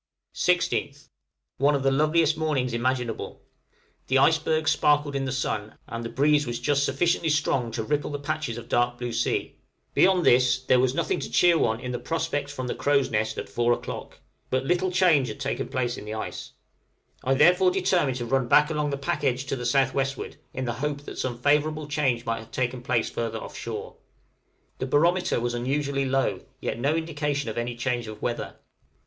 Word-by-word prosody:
16th. 145 -5 0 0.5
One 145 +2 +4
of 135 - -1
the 135 - +3
loveliest 155 +3 +3
mornings 145 -6 -1
imaginable: 125 -1 -2 0.6
the 135 - +3
icebergs 155 +2 +3
sparkled 145 -1 +2
in 135 0 -1
the 130 - -2
sun, 110 -5 -3
and 115 0 -5
the 115 - -4
breeze 145 +2 +2
was 120 -1 -3
just 145 -1 +1
sufficiently 160 +4 +1
strong 140 -5 +1
to 115 0 -3
ripple 145 +5 -1
the 145 - -3
patches 145 -4 -3
of 120 - -8
dark 120 0 +1
blue 120 -1 -4
sea; - - -1 0.3
beyond 185 -2 +4
this, 125 0 +4
there 130 -1 +4
was 130 +1 +2
nothing - - 0
to - - -5
cheer 175 -1 +4
one 115 -7 +1
in 125 0 -5
the 125 - -3
prospect 160 -3 -2
from 130 -3 -5
the 125 - -2
crow's 140 -3 +1
nest 110 0 -1
at - - -4
four 120 0 +1
o'clock; - - -6 0.3
but 130 +1 0
little 180 +4 +1
change 175 -8 +4
had - - -7
taken 135 0 -2
place 125 -1 -2
in - - -10
the 105 +1 -5
ice; 110 - -6 0.7
I 135 +1 +2
therefore 180 +6 +5
determined 180 -8 +1
to 120 - -4
run 130 +1 +1
back 150 +5 +5
along 150 -1 0
the 140 - -2
pack 140 +1 -2
edge 130 -1 0
to 135 - -2
the 120 -2 -3
south 135 +2 +2
westward, 135 -1 -2
in 130 - -4
the 120 - -1
hope 145 -1 -2
that - - -9
some 125 -2 -2
favorable 150 +3 +1
change 135 -5 0
might 115 0 -1
have 110 0 -12
taken 125 0 -2
place 120 -2 0
further 115 -1 -3
off - - -8
shore. - - -6 0.8
The 130 - -2
barometer 170 +3 +2
was 120 +1 -2
unusually 140 +3 -1
low, 135 0 0 0.2
yet - - -3
no 140 +5 +1
indication 145 -5 -2
of - - -9
any 120 0 -3
change 120 -1 -2
of 110 0 -8
weather. 120 -1 -3
135 Hz, 200 wpm, -26 LUFS, 120-150 Hz, 0.8 s, therefore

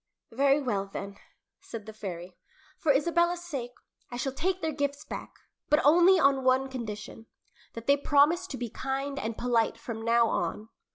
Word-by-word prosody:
"Very 275 +4 +3
well, 200 -6 -1
then," 200 0 -7 0.4
said 225 -3 -8
the 220 - -9
fairy. 180 -4 -7 0.4
"For 310 - +3
Isabella's 340 +4 +2
sake, 265 -8 -5 0.4
I 245 - -6
shall 270 +2 -2
take 360 +6 -1
their 320 -2 -1
gifts 285 0 -3
back, - - -7 0.4
but 300 - +5
only 350 +5 +6
on 275 -3 +3
one 260 +1 +3
condition 225 -2 -7 0.5
that 230 0 -8
they 280 +2 +4
promise 295 +6 +3
to 275 - -6
be 245 - -3
kind 275 +2 -3
and 225 -2 -4
polite 235 -2 +1
from 230 -1 -6
now 230 +1 +3
on." 220 0 -2
265 Hz, 170 wpm, -28 LUFS, 230-290 Hz, 0.5 s, only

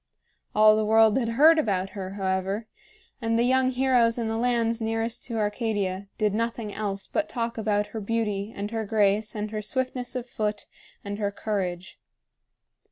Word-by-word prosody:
All 215 0 +7
the 215 - +1
world 220 0 +5
had 230 -3 -1
heard 310 +7 +6
about 195 -7 0
her, 190 -1 -6
however; 195 +2 -1 0.6
and 230 0 +1
the 235 - +3
young 260 +1 +3
heroes 250 -3 +3
in 230 -2 -1
the 225 - -1
lands 230 -1 +1
nearest 225 +1 -2
to 235 -2 -4
Arcadia 205 -3 -1
did 210 -3 +1
nothing 230 -1 -2
else 200 -2 -3
but 315 - -2
talk 230 -1 -2
about 210 -2 0
her 220 - -4
beauty 210 -1 -1
and 205 0 -5
her 225 -1 -2
grace 210 0 +1
and 210 0 -3
her 215 -1 -3
swiftness 250 +3 -3
of 250 -1 -3
foot 210 -3 -3 0.4
and 205 +1 -4
her 205 -1 0
courage. 190 -3 -4
220 Hz, 170 wpm, -26 LUFS, 205-230 Hz, 0.6 s, All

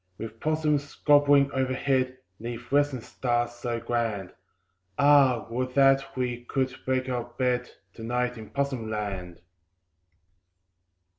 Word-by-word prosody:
With 115 0 -8
possums 150 -1 0
gambolling 145 -1 +5
overhead, 130 0 0 0.2
'Neath 120 +2 -7
western 145 -3 +2
stars 120 0 -1
so 120 -1 -4
grand, 115 -5 -2 0.6
Ah! 140 -4 +5
would 125 +1 -2
that 135 -1 +3
we 120 -1 -2
could 130 0 -1
make 130 0 0
our 125 -2 -2
bed 125 +1 -1 0.2
To 115 - -10
night 125 +1 -1
in 110 -2 -10
Possum 135 -5 -2
Land. 95 -5 -4
125 Hz, 120 wpm, -27 LUFS, 120-135 Hz, 0.6 s, gambolling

